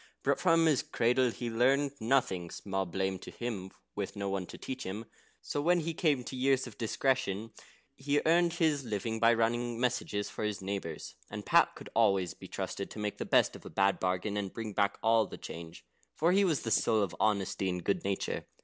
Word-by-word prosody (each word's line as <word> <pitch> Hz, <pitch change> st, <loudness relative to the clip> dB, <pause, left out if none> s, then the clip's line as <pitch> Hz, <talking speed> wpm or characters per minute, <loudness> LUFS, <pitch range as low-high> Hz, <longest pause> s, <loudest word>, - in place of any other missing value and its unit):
But -, -, +2 dB
from 165 Hz, -2 st, +4 dB
his 150 Hz, -5 st, +4 dB
cradle 125 Hz, +2 st, +2 dB
he 120 Hz, 0 st, -4 dB
learned 135 Hz, +5 st, +3 dB
nothing 110 Hz, -8 st, +1 dB
(small 95 Hz, 0 st, -3 dB
blame 95 Hz, +1 st, -2 dB
to -, -, -9 dB
him 105 Hz, -6 st, -5 dB, 0.2 s
with -, -, -4 dB
no 100 Hz, -1 st, -2 dB
one 95 Hz, -2 st, -2 dB
to -, -, -9 dB
teach 130 Hz, 0 st, -6 dB
him!), 105 Hz, +5 st, -5 dB, 0.4 s
so 145 Hz, -, -2 dB
when 175 Hz, +3 st, +3 dB
he 165 Hz, +1 st, -2 dB
came 150 Hz, -6 st, +1 dB
to 130 Hz, -, -6 dB
years 130 Hz, +1 st, +2 dB
of 120 Hz, -, -10 dB
discretion, 115 Hz, -3 st, 0 dB, 0.4 s
he 145 Hz, +2 st, +1 dB
earned 170 Hz, +1 st, +4 dB
his 155 Hz, -5 st, +1 dB
living 110 Hz, 0 st, -2 dB
by 115 Hz, +1 st, +6 dB
running 120 Hz, +1 st, 0 dB
messages 120 Hz, -4 st, 0 dB
for -, -, -5 dB
his 105 Hz, -1 st, -1 dB
neighbours; 95 Hz, -5 st, -5 dB, 0.2 s
and -, -, -6 dB
Pat -, -, +4 dB
could -, -, -11 dB
always 95 Hz, -3 st, +3 dB
be -, -, -11 dB
trusted 100 Hz, -, -4 dB
to -, -, -10 dB
make 105 Hz, -1 st, -3 dB
the -, -, -2 dB
best -, -, +3 dB
of -, -, -11 dB
a -, -, -8 dB
bad 100 Hz, 0 st, +2 dB
bargain, 95 Hz, +3 st, -1 dB
and 100 Hz, -2 st, -2 dB
bring 110 Hz, -2 st, -5 dB
back 100 Hz, 0 st, +1 dB
all 110 Hz, -1 st, +4 dB
the -, -, -9 dB
change, 85 Hz, -1 st, -9 dB, 0.3 s
for 165 Hz, +3 st, +3 dB
he 195 Hz, +2 st, +4 dB
was 165 Hz, -7 st, +2 dB
the 115 Hz, -, -2 dB
soul 110 Hz, -2 st, +3 dB
of 95 Hz, -, -3 dB
honesty 100 Hz, -2 st, +1 dB
and 90 Hz, -1 st, -3 dB
good 100 Hz, -, 0 dB
nature. 100 Hz, 0 st, -2 dB
115 Hz, 210 wpm, -31 LUFS, 100-135 Hz, 0.4 s, by